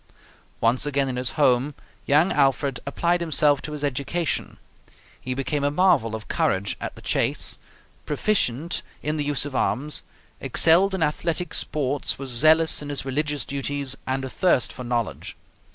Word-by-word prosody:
Once 115 +3 +2
again 140 -1 +1
in 130 - -3
his 125 0 -2
home, 135 -1 +2 0.3
young 150 +6 +4
Alfred 135 -2 +1
applied 170 +5 0
himself 150 -3 +3
to 150 - -6
his 150 -1 -5
education. 145 +4 -2 0.6
He 130 0 -4
became 140 +2 -2
a 145 - +2
marvel 145 - +2
of 110 - -8
courage 95 +1 0
at - - -5
the - - -14
chase, - - 0 0.5
proficient 155 - 0 0.2
in 150 +1 -1
the 150 - 0
use 145 -1 +1
of 145 -2 -6
arms, 145 +4 0 0.4
excelled 190 +4 +4
in 180 - 0
athletic 165 +3 -1
sports, 145 -1 -1
was 135 -1 -5
zealous 155 +7 +4
in 145 - -7
his 145 -2 -3
religious 145 +2 -1
duties, 140 -1 -2
and 130 0 -1
athirst 130 0 +1
for 125 - -8
knowledge. 120 -3 -3
145 Hz, 155 wpm, -24 LUFS, 130-155 Hz, 0.6 s, young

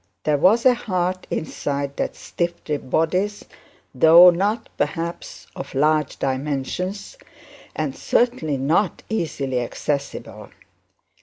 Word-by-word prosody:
There 150 -2 +1
was 220 - +4
a 255 - +7
heart 185 -6 -2
inside 140 -3 -3
that - - -2
stiff 170 0 -3
ribbed 145 -3 -3
bodice, 185 +8 0 0.5
though 165 +6 +8
not, 205 +6 -1
perhaps, 170 -1 -4
of - - -8
large 150 +1 +1
dimensions, 150 - -3 0.6
and - - -2
certainly 235 - 0
not 160 +9 0
easily 140 - -1
accessible. 140 +3 -4
165 Hz, 105 wpm, -22 LUFS, 140-190 Hz, 0.6 s, though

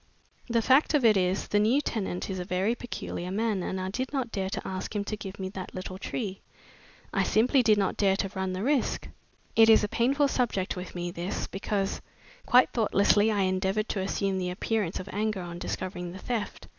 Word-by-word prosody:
The 230 -1 +2
fact 275 +5 +4
of 275 -5 +3
it 220 -2 +6
is, 185 0 +1
the 205 - +3
new 225 +7 +4
tenant 200 -10 -3
is 190 -2 -4
a - - -2
very 185 +5 0
peculiar 235 -7 -5
man 210 0 0
and 190 +1 -3
I 185 0 -3
did 260 +5 -3
not 260 -5 -2
dare 190 -2 -2
to - - -4
ask 190 +3 -5
him 205 - 0
to 215 - -3
give 200 -2 -8
me 190 - -3
that 190 -1 -7
little 185 0 -6
tree. 195 -2 -4 0.7
I - - +2
simply 250 +5 +3
did 220 -3 +4
not 195 -2 0
dare 195 -2 +3
to 195 - -1
run 190 -1 -2
the 185 +2 -3
risk. 275 0 0 0.5
It 225 0 +7
is 220 - +7
a - - +1
painful 260 +6 +2
subject 235 -8 0
with 180 0 -7
me, 175 0 -3
this, 175 +3 -3
because 195 0 -2 0.5
quite 250 +1 +6
thoughtlessly 210 -1 +3
I 205 -2 +1
endeavored 190 +3 0
to 200 - -1
assume 195 0 -1
the 180 -1 -2
appearance 195 0 -1
of 185 - -7
anger 210 -2 -1
on 175 0 -7
discovering 180 -1 -4
the - - -8
theft. 230 +1 -4
200 Hz, 210 wpm, -28 LUFS, 185-225 Hz, 0.7 s, It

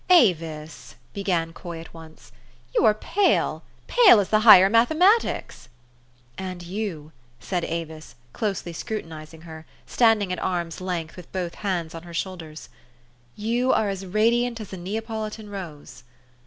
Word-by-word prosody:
4 365 - +9
'Avis," 160 - 0 0.2
began 175 -5 -1
Coy 170 -1 -8
at 165 - -12
once, 160 -1 -14 0.4
"you - - +2
are 215 - +6
pale, 395 - +1 0.2
pale 445 - +6
as 200 - -1
the 215 - +4
higher 210 -4 +9
mathematics." 315 - +2 0.3
" 120 - -36 0.3
And 185 -2 -6
you," 175 -5 -5 0.3
said 175 +7 -3
Avis, 160 -4 -6 0.2
closely 195 -5 -3
scrutinizing 160 -5 -7
her, 160 -1 -11 0.2
standing 220 -6 +2
at - - -4
arm's 175 -2 -3
length, 175 -3 -4
with 180 -2 -12
both 180 -2 -3
hands 175 -6 -3
on 165 - -7
her 170 0 -11
shoulders, 160 -4 -6 0.4
" - - -35 0.3
you 235 +4 0
are 210 - +1
as 195 -1 -4
radiant 230 +5 +1
as 210 -3 -9
a - - -5
Neapolitan 215 +2 -5
rose." 170 -7 -9
185 Hz, 150 wpm, -24 LUFS, 165-215 Hz, 0.4 s, 4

